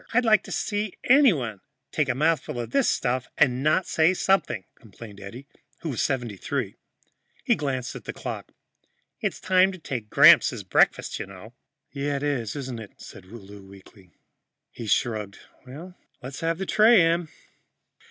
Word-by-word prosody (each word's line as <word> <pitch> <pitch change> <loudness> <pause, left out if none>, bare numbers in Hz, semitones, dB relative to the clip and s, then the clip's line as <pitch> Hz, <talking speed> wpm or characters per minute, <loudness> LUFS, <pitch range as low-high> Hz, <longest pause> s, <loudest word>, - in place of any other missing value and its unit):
"I'd 250 0 +3
like 215 -4 +5
to - - -10
see 205 -2 -3
anybody 170 - +3 0.3
take 150 -3 0
a 125 - 0
mouthful 150 -3 0
of 120 - -5
this 275 -3 +2
stuff 130 0 -1
and 130 -3 +2
not 155 +5 +2
say 165 0 +2
something," 175 - 0
complained 105 -1 -13
Eddie, 115 +7 -10 0.4
who 165 - -4
was 125 - -2
73. 120 -7 -3 0.7
He - - +3
glanced 130 -4 -3
at - - -10
the - - -4
clock. - - -7 0.7
"It's - - -3
time 185 +1 +3
to - - -9
take 125 - -6
Gramps - - +7
his - - -7
breakfast, - - +1
you - - -5
know." 100 +4 -13 0.4
"Yeah, 140 0 -2
it 140 - -4
is, 125 -8 -2
isn't 130 -4 -5
it?" 105 -3 -11
said 95 - -12
Lou 100 -1 -12
weakly. 95 -1 -17 0.6
He 115 - -8
shrugged. 105 -1 -1 0.9
"Let's 135 +1 -7
have 165 0 -1
the 190 - -4
tray, 215 -2 +5
Em." 165 0 0
135 Hz, 160 wpm, -25 LUFS, 110-170 Hz, 0.9 s, Gramps